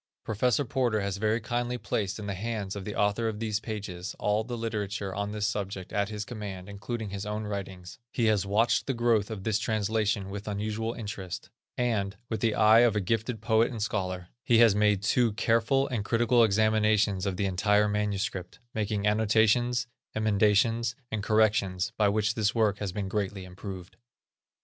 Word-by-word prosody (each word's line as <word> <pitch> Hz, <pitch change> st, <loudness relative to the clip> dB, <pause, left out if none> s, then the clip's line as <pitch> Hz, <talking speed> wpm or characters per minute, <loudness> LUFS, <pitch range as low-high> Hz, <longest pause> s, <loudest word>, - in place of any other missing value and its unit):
Prof. 120 Hz, +4 st, +1 dB
Porter 120 Hz, -3 st, +1 dB
has 100 Hz, -1 st, -2 dB
very 110 Hz, +2 st, +1 dB
kindly 120 Hz, +2 st, -2 dB
placed 100 Hz, -5 st, -2 dB
in 105 Hz, -, -6 dB
the 100 Hz, -, -2 dB
hands 105 Hz, -1 st, -3 dB
of 100 Hz, -2 st, -6 dB
the 105 Hz, -, -5 dB
author 105 Hz, +3 st, +1 dB
of 110 Hz, -2 st, -2 dB
these 110 Hz, -2 st, -1 dB
pages, 100 Hz, -5 st, -6 dB
all 105 Hz, +1 st, +1 dB
the 120 Hz, +1 st, -5 dB
literature 105 Hz, -3 st, -3 dB
on 100 Hz, +1 st, -3 dB
this 105 Hz, -1 st, -2 dB
subject 100 Hz, -3 st, -3 dB
at 100 Hz, 0 st, 0 dB
his 105 Hz, -1 st, -4 dB
command, 100 Hz, -5 st, -7 dB
including 105 Hz, +1 st, -5 dB
his 100 Hz, 0 st, -4 dB
own 105 Hz, +1 st, -3 dB
writings; 95 Hz, -3 st, -6 dB
he 120 Hz, -, 0 dB
has 105 Hz, -4 st, +3 dB
watched 105 Hz, +4 st, +2 dB
the 135 Hz, -, 0 dB
growth 115 Hz, -3 st, +2 dB
of 105 Hz, -4 st, -6 dB
this 110 Hz, 0 st, +1 dB
translation 110 Hz, -2 st, 0 dB
with 105 Hz, +1 st, -6 dB
unusual 110 Hz, +2 st, -2 dB
interest; 100 Hz, -5 st, -6 dB, 0.3 s
and, 110 Hz, -5 st, 0 dB
with 110 Hz, -, -2 dB
the 115 Hz, -2 st, +1 dB
eye 110 Hz, +1 st, +6 dB
of 120 Hz, -2 st, +4 dB
a -, -, +2 dB
gifted 110 Hz, +3 st, -1 dB
poet 110 Hz, 0 st, +3 dB
and 115 Hz, -4 st, -3 dB
scholar, 95 Hz, -4 st, -3 dB
he 120 Hz, -, +4 dB
has 115 Hz, -3 st, +7 dB
made 105 Hz, -1 st, +2 dB
two 120 Hz, +1 st, +2 dB
careful 115 Hz, +5 st, +2 dB
and 115 Hz, -5 st, -2 dB
critical 120 Hz, +2 st, +3 dB
examinations 110 Hz, -2 st, +2 dB
of 95 Hz, -2 st, -2 dB
the 100 Hz, -, 0 dB
entire 105 Hz, +2 st, +2 dB
manuscript, 105 Hz, -3 st, -2 dB, 0.2 s
making 105 Hz, -1 st, -1 dB
annotations, 110 Hz, +3 st, +3 dB, 0.3 s
emendations, 110 Hz, +2 st, +2 dB, 0.2 s
and 110 Hz, -, -2 dB
corrections, 100 Hz, -4 st, +2 dB
by 105 Hz, -2 st, +3 dB
which 110 Hz, +1 st, +1 dB
this 110 Hz, -1 st, 0 dB
work 105 Hz, -3 st, +2 dB
has 100 Hz, -3 st, -3 dB
been 100 Hz, +1 st, -3 dB
greatly 100 Hz, -1 st, -3 dB
improved. 90 Hz, 0 st, -9 dB
105 Hz, 180 wpm, -28 LUFS, 100-115 Hz, 0.3 s, has